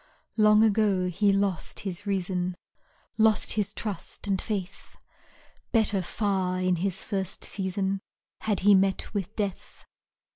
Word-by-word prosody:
Long 215 0 +6
ago 205 -4 +2
he 200 +3 +2
lost 195 -3 0
his 195 +1 -6
reason, 185 -2 -1 0.6
Lost 220 -1 +3
his 205 -2 0
trust 205 -4 -5
and 195 -2 0
faith 200 -3 -5 0.7
Better 215 -4 +3
far 185 -1 -1
in 185 -1 +1
his 190 +2 -2
first 195 -2 -2
season 195 0 -2 0.4
Had 210 -3 -1
he 205 +2 +6
met 195 +2 +2
with 200 -1 -3
death. 200 -3 -5
195 Hz, 125 wpm, -27 LUFS, 185-210 Hz, 0.7 s, Long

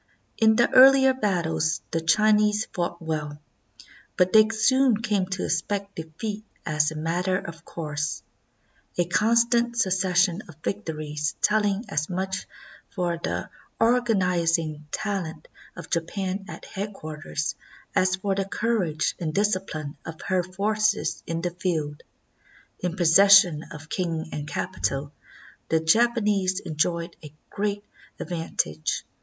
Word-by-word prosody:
In 220 -1 +5
the 240 +1 +4
earHer 265 0 +6
battles 165 -5 0
the 165 - 0
Chinese 210 +5 +3
fought 175 -1 -2
well, 150 -2 -3 0.8
but 180 0 +3
they 215 0 +7
soon 245 +2 +3
came 210 -4 0
to 190 0 -3
expect 200 +4 -2
defeat 195 +7 -5 0.2
as 150 -1 +2
a 155 - -8
matter 175 +4 0
of 170 -3 -8
course, 150 -3 -4 0.7
a 175 - +2
con 215 +7 +2
stant 235 0 +2
succession 185 -2 +2
of 165 - -12
victories 155 -6 -3
telling 210 +1 +2
as 150 0 -2
much 190 +1 -3 0.4
for 175 -4 -2
the - - -3 0.3
organ 230 -3 +3
izing 165 -4 0
talent 170 -5 -4 0.3
of - - -10
Japan 190 +3 -2
at - - -9
headquarters 155 -6 -4 0.4
as 185 0 +3
for 195 +1 -1
the 195 0 -1
courage 195 -7 0
and 155 -3 -3
discipline 185 -7 -1
of 160 -1 -8
her 185 -1 +1
forces 210 +4 0
in 165 0 -2
the 175 0 -2
field. 160 -4 -2 0.8
In 180 -1 -2
possession 180 -2 +6
of 150 0 -10
king 165 -3 -3
and 150 0 -5
capital, 145 -7 -2 0.6
the 160 - +3
Japanese 205 0 +2
enjoyed 170 +1 -2
a 150 - -9 0.2
great 205 0 -2 0.4
ad - - -6
vantage. 80 - -2
185 Hz, 130 wpm, -25 LUFS, 160-210 Hz, 0.8 s, they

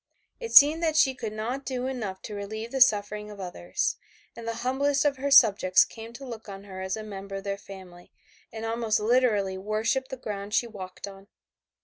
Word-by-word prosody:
It 465 -2 -6
seemed 300 +3 +8
that 320 -2 +1
she 265 -3 +4
could 230 -4 -5
not 235 +6 -4
do 255 -2 -3
enough 220 -8 -4
to 210 - -7
relieve 220 +3 -6
the 265 - -2
sufferings 210 -2 +3
of 205 - -11
others, 185 - -3 0.4
and 230 -1 -9
the 230 - -2
humblest 275 +2 +1
of 285 -2 +2
her 280 +2 -2
subjects 210 -8 +6
came 225 0 -10
to 270 +3 -9
look 225 -4 -9
on 195 0 -8
her 190 -2 -9
as 190 +2 -3
a 215 - -6
member 195 -2 -8
of 195 - -5
their 200 -1 -2
family, 185 -3 -13 0.4
and 225 0 -6
almost 225 -1 0
literally 210 -4 +1
worshipped 220 +6 -1
the 265 - -6
ground 205 -3 -5
she 235 - +2
walked 195 -4 -8
on. 195 0 -12
220 Hz, 205 wpm, -27 LUFS, 200-255 Hz, 0.4 s, seemed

